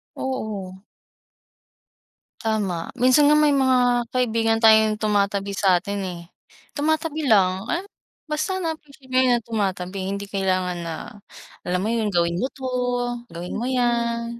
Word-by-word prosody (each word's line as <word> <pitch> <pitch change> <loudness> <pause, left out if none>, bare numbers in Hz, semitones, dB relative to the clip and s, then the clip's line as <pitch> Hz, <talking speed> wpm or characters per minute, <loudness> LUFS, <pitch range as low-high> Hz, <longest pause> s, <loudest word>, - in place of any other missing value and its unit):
Oo. 205 -8 -5 1.6
Tama 205 -7 -1
minsan 255 +4 +5
nga 300 - +5
may 300 -1 +4
mga 250 -3 +3
kaibigan 225 -2 +1
tayong 220 -1 +6
tumatabi 200 -2 0
satin, 195 +1 +1
eh, 175 -2 -6 0.5
tumatabi 315 0 -1
lang, 190 -1 +3
eh, 345 +7 -1 0.5
basta 310 +5 -1
na 325 - 0
appreciate 275 -3 -19
ko 255 - +3
yun 245 -2 +3
tumatabi. 195 -4 -3
Hindi 200 +1 -3
kailangan 185 -2 0
na, 170 -1 -4 0.7
alam 180 +1 0
mo 220 - 0
yun, 225 -2 0
"Gawin 170 -3 +1
mo 255 - 0
'to", 265 - -15 0.6
"Gawin 175 +3 -6
mo 240 - -2
yan", 235 -2 -1
220 Hz, 135 wpm, -23 LUFS, 195-255 Hz, 1.6 s, tayong